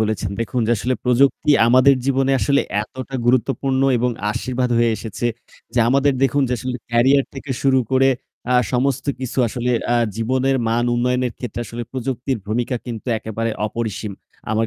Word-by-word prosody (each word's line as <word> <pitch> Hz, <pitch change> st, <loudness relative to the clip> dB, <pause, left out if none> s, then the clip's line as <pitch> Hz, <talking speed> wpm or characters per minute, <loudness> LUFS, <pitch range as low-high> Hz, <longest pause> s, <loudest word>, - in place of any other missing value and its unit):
বলেছেন। 110 Hz, -2 st, -1 dB
দেখুন 120 Hz, +2 st, -1 dB
যে -, -, 0 dB
আসলে 125 Hz, +5 st, -1 dB
প্রযুক্তি 130 Hz, +4 st, +3 dB, 0.2 s
আমাদের 130 Hz, +3 st, +6 dB
জীবনে 135 Hz, 0 st, +2 dB
আসলে 140 Hz, 0 st, +3 dB, 0.2 s
এতটা 130 Hz, +4 st, -9 dB
গুরুত্বপূর্ণ 130 Hz, +2 st, +1 dB, 0.2 s
এবং 125 Hz, +1 st, +1 dB, 0.2 s
আশীর্বাদ 125 Hz, +3 st, -2 dB
হয়ে 115 Hz, 0 st, +3 dB
এসেছে 115 Hz, +2 st, -4 dB, 0.5 s
যে -, -, +1 dB
আমাদের 140 Hz, +2 st, +3 dB
দেখুন 135 Hz, +2 st, +3 dB
যে -, -, -1 dB
আসলে 125 Hz, +2 st, -3 dB
career 130 Hz, +4 st, +4 dB
থেকে 135 Hz, +1 st, -8 dB
শুরু 135 Hz, -1 st, +4 dB
করে 135 Hz, 0 st, +4 dB, 0.4 s
আ -, -, +3 dB, 0.2 s
সমস্ত 130 Hz, +2 st, 0 dB, 0.2 s
কিছু 130 Hz, 0 st, -4 dB
আসলে 125 Hz, +2 st, -2 dB, 0.2 s
আ -, -, +4 dB, 0.2 s
জীবনের 130 Hz, +4 st, +1 dB
মান 115 Hz, +1 st, +1 dB
উন্নয়নের 125 Hz, 0 st, 0 dB
ক্ষেত্রে 120 Hz, -1 st, -5 dB
আসলে 120 Hz, +1 st, -6 dB
প্রযুক্তির 130 Hz, 0 st, -2 dB
ভূমিকা 120 Hz, +4 st, -1 dB
কিন্তু 115 Hz, -1 st, -6 dB
একেবারে 110 Hz, +1 st, -3 dB, 0.2 s
অপরিসীম। 110 Hz, -1 st, -4 dB, 0.4 s
আমার 110 Hz, +1 st, +1 dB
125 Hz, 160 wpm, -20 LUFS, 115-135 Hz, 0.5 s, আমাদের